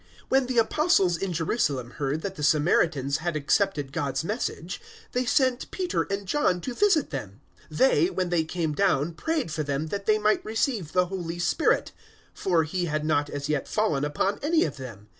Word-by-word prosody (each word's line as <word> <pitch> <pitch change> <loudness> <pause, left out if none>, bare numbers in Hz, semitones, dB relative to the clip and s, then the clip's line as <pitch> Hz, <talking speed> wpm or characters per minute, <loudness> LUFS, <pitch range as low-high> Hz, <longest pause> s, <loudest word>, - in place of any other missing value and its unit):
008:014 - - -30 0.2
When 265 0 +3
the 255 -1 -2
Apostles 230 - +3
in 190 +2 -3
Jerusalem 155 - -1
heard 145 +3 -2
that 195 - -3
the 180 - -9
Samaritans 150 -2 +2
had 170 0 -3
accepted 150 -1 +1
God's 140 -2 -2
Message, 185 -3 -4 0.3
they 250 +1 0
sent 255 -1 +1
Peter 365 -2 -1
and 200 0 -3
John 185 -8 +1
to 255 - -4
visit 380 0 +2
them. - - -6 0.3
008:015 - - -8
They, - - +4
when 185 - -2
they 170 -2 +2
came 160 -1 -2
down, 165 -3 +1
prayed 305 - -2
for 155 - -2
them 145 +1 -2
that 200 +2 -4
they 215 0 +4
might 215 0 +2
receive 220 - -1
the 180 0 +3
Holy 175 -2 -5
Spirit: 180 - +1 0.4
008:016 - - -14
for 170 -4 +3
He 175 +3 -2
had 155 -2 -2
not 145 -2 +1
as 145 0 -4
yet 150 -2 -1
fallen 210 -10 0
upon 150 +7 -1
any 320 +3 +3
of - - -3
them. 115 -6 -9
175 Hz, 195 wpm, -26 LUFS, 150-220 Hz, 0.4 s, They